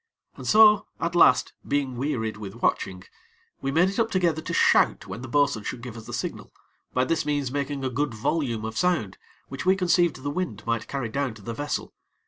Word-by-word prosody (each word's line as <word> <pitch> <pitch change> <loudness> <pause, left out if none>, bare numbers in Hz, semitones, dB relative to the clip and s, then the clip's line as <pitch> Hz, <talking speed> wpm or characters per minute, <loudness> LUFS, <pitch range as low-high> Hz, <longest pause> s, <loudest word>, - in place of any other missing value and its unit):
And - - -8
so, 210 -1 +6
at 170 +1 -1
last, 175 - +5
being 140 -3 0
wearied 120 -4 -2
with 105 -1 -8
watching, 95 -1 0 0.6
we 135 - -1
made 170 +6 +4
it 195 +3 -3
up 225 0 +2
together 170 -5 +1
to 170 - -6
shout - - +3
when 115 - -7
the 130 - -7
bo'sun 140 -5 +1
should 120 - -5
give 125 -3 -7
us 115 -1 -10
the - - -7
signal, - - -5 0.4
by 125 - +1
this 165 +4 0
means 145 -3 -1
making 140 -1 -2
a - - 0
good 140 -1 -1
volume 115 -2 -1
of 110 0 -5
sound 160 - 0 0.3
which 135 - -6
we 185 +1 +4
conceived 175 -4 +2
the 145 - -2
wind 135 - -3
might 115 -1 -1
carry 135 -5 -3
down 135 -1 -2
to 105 - -14
the 115 - -4
vessel. 145 +4 -4
140 Hz, 210 wpm, -25 LUFS, 115-165 Hz, 0.6 s, so